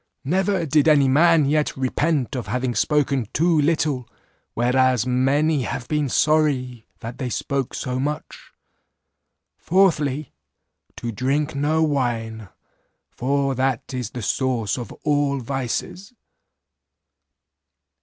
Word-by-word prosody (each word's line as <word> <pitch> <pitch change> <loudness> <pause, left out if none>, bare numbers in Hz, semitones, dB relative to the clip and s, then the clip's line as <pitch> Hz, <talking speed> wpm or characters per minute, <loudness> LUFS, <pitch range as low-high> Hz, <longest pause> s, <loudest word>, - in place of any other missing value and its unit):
Never 185 +3 +1
did 150 0 +2
any 145 -3 +5
man 160 +3 +4
yet 150 +1 0
repent 135 +1 0
of 125 - -4
having 125 0 -1
spoken 140 -4 +1
too 165 0 +3
little, 145 -5 0 0.5
whereas 125 0 +2
many 135 +4 +2
have 130 0 -4
been 150 -3 0
sorry 130 -6 +1
that 115 +1 -7
they 130 -3 -2
spoke 135 +1 -2
so 125 0 -3
much. 145 +3 -5 1.1
"Fourthly, 155 -7 +1 0.6
To 120 - -4
drink 135 +7 -1
no 150 +3 +1
wine, 115 -7 -2 0.6
for 135 +2 0
that 130 0 -1
is 125 -4 -3
the 120 -1 -7
source 120 -2 0
of 120 -4 -6
all 145 -2 +1
vices. 135 - -4
135 Hz, 115 wpm, -22 LUFS, 125-150 Hz, 1.1 s, any